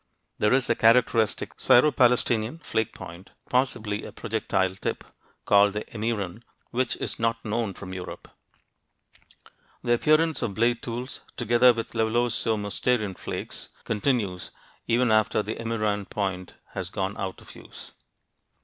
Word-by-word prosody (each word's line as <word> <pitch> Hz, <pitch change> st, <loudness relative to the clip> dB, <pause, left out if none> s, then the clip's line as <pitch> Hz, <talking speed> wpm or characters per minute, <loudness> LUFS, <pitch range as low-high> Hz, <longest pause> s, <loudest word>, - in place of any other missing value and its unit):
There 105 Hz, -, +3 dB
is 130 Hz, -1 st, +1 dB
a -, -, +4 dB
characteristic 115 Hz, -1 st, +3 dB
Syro 150 Hz, +5 st, +6 dB
Palestinian 120 Hz, 0 st, +2 dB
flake 110 Hz, -8 st, -2 dB
point, 85 Hz, +4 st, -10 dB, 0.2 s
possibly 110 Hz, -5 st, 0 dB
a -, -, -8 dB
projectile 100 Hz, -4 st, -1 dB
tip, 95 Hz, -, -4 dB, 0.4 s
called 100 Hz, -1 st, +5 dB
the 105 Hz, -, -3 dB
Emiran, 110 Hz, -3 st, -2 dB, 0.3 s
which 125 Hz, +1 st, 0 dB
is -, -, -4 dB
not 115 Hz, 0 st, -1 dB
known 110 Hz, -2 st, -1 dB
from 95 Hz, -2 st, -8 dB
Europe. 90 Hz, -1 st, -7 dB, 1.6 s
The 120 Hz, -, +2 dB
appearance 155 Hz, +4 st, +3 dB
of 110 Hz, -6 st, -2 dB
blade 120 Hz, +1 st, +2 dB
tools, 120 Hz, +3 st, -5 dB, 0.2 s
together 120 Hz, +1 st, +5 dB
with 115 Hz, -1 st, -4 dB
Levalloiso 115 Hz, 0 st, +1 dB
Mousterian 105 Hz, 0 st, -1 dB
flakes, -, -, -6 dB
continues 105 Hz, -6 st, -1 dB, 0.4 s
even 120 Hz, 0 st, +3 dB
after 110 Hz, -1 st, +3 dB
the 110 Hz, -, -3 dB
Emiran 110 Hz, -3 st, -1 dB
point 95 Hz, -3 st, -3 dB, 0.2 s
has -, -, -4 dB
gone 95 Hz, +1 st, -3 dB
out 95 Hz, -1 st, -4 dB
of -, -, -13 dB
use. -, -, -12 dB
110 Hz, 135 wpm, -26 LUFS, 105-120 Hz, 1.6 s, Syro